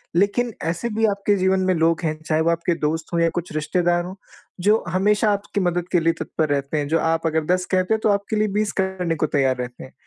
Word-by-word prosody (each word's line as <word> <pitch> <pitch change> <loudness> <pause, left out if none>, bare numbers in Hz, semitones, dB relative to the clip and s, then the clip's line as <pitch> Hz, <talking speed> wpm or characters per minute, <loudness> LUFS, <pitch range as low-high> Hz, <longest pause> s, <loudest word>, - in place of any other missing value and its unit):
लेकिन 205 +6 +1
ऐसे 170 +8 -2
भी 225 0 +2
आपके 200 0 +1
जीवन 190 0 +2
में 185 - +3
लोग 165 0 +2
हैं, 155 -1 -1
चाहे 155 0 +1
वो 165 - +2
आपके 170 +1 0
दोस्त 155 +2 -2
हों 170 - +2
या 165 - +3
कुछ 175 -2 -4
रिश्तेदार 175 +3 +1
हों, 185 +1 -7 0.5
जो 210 +4 +3
हमेशा 210 +4 +2
आपकी 200 0 -3
मदद 175 0 -3
के 175 - +5
लिए 165 +1 +2
तत्पर 155 -2 -2
रहते 140 +1 -1
हैं। 145 -1 -1
जो 165 +1 +2
आप 165 0 0
अगर 160 -1 0
10 180 0 -4
कहते 185 +2 +2
हैं - - -3
तो - - +3
आपके 200 +2 0
लिए 215 0 +2
20 215 -1 0
करने 185 -3 -2
को 155 - 0
तैयार 135 -3 +1
रहते 125 0 -6
हैं। 130 - -13
175 Hz, 245 wpm, -22 LUFS, 160-200 Hz, 0.5 s, के